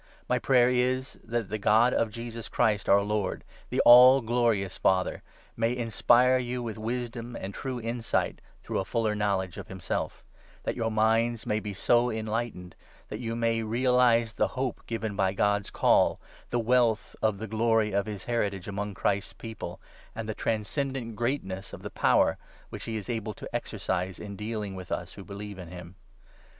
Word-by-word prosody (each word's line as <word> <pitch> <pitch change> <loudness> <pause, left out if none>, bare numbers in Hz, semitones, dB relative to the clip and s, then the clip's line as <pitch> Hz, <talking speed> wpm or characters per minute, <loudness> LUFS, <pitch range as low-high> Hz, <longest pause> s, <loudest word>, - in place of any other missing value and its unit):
My - - +2
prayer 125 -2 +4
is 130 +1 0
that 115 -3 -2
the 110 - -3
God 110 +4 +4
of 115 - +1
Jesus 115 0 -7
Christ 105 -3 +1
our 100 0 +6
Lord, 105 -2 -2 0.3
the - - +1
all 125 +3 +9
glorious 115 -5 +1
Father, 95 -1 +1 0.3
may 115 +1 +1
in 120 -2 -3
spire 125 +3 +5
you 125 0 -3
with 110 -2 -5
wisdom 120 +1 -4
and 95 +1 -6
true 130 +2 -4
insight 115 0 -1 0.2
through - - -2
a - - 0
fuller 110 +1 0
know 105 -2 +1
ledge 95 -2 -5
of - - -8
himself; 95 -3 -4 0.4
that - - -2
your 115 -2 -1
minds 115 +1 +2
may 105 - 0
be 105 -2 -6
so 120 +5 +3
enlightened 110 -4 -3 0.3
that - - -5
you 115 -1 -3
may 115 -1 +1
realize 120 0 +3
the - - +1
hope 130 -2 -2
given 110 -2 -3
by 95 -2 +1
God's 100 0 +1
Call, - - +3 0.3
the 120 - 0
wealth 120 -1 +2
of 110 -2 +1
the 110 - -5
glory 110 0 +2
of 100 +1 0
his 105 -3 -5
heritage 100 -6 -1
among 100 0 -4
Christ's 100 +2 -1
People, 115 -1 -7 0.4
and 115 0 -5
the 110 - -2
transcen 115 +7 -1
dant 115 -4 -5
greatness 105 -6 -3
of - - -9
the - - -6
power - - +3 0.3
which - - -7
he 110 -1 -3
is 105 - -6
able 110 -3 -3
to - - -8
exercise 90 0 -2
in 100 -1 -7
deal 105 +1 -4
ing 100 -2 -5
with 95 -2 -9
us - - -3
who 100 - -10
believe 100 0 -8
in 90 - -8
him. 90 0 -10
110 Hz, 185 wpm, -28 LUFS, 100-120 Hz, 0.4 s, all